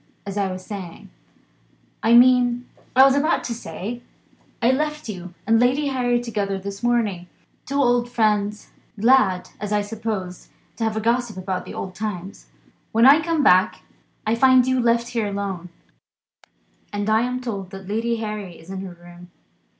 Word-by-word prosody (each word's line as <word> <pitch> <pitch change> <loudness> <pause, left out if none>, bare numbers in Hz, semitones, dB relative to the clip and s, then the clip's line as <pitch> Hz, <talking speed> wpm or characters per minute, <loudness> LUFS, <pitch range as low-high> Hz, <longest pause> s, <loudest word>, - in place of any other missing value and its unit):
As 200 -1 -5
I 200 -2 0
was 185 0 -7
saying 190 -5 -8 0.9
I 225 - +3
mean 245 0 +5 0.3
as 260 - +8
I - - +9
was 270 0 +4
about 300 +4 +1
to 235 - -3
say 235 0 -6 0.6
I 240 +1 +3
left 300 +2 -2
you 180 -4 -7
and 225 0 +4
Lady 265 +4 +2
Harry 245 -2 +1
together 205 -5 -2
this 200 +1 -7
morning; 220 -7 0 0.4
two 280 - -4
old 245 -3 +2
friends, 210 -3 0 0.3
glad 210 -6 +3
(as 210 0 -5
I 210 0 +2
supposed) 205 -4 -5 0.3
to 230 - -3
have 220 -1 -1
a - - -1
gossip 235 -2 0
about 185 0 -4
old 185 - -6
times. 195 -2 -6 0.4
When 230 +2 +4
I 285 +4 +8
come 320 -2 0
back, 185 -7 +4 0.4
I 220 - +1
find 255 +1 +5
you 260 0 +1
left 235 0 +2
here 230 -3 -1
alone, 195 -3 -4 1.2
and 205 0 -3
I 220 +1 +3
am 250 +1 -2
told 200 -7 -5
that 195 -1 -10
Lady 225 +3 -1
Harry 210 -5 -5
is 165 +4 -13
in 190 -1 -5
her 190 -2 -7
room. 175 0 -14
220 Hz, 170 wpm, -22 LUFS, 195-245 Hz, 1.2 s, I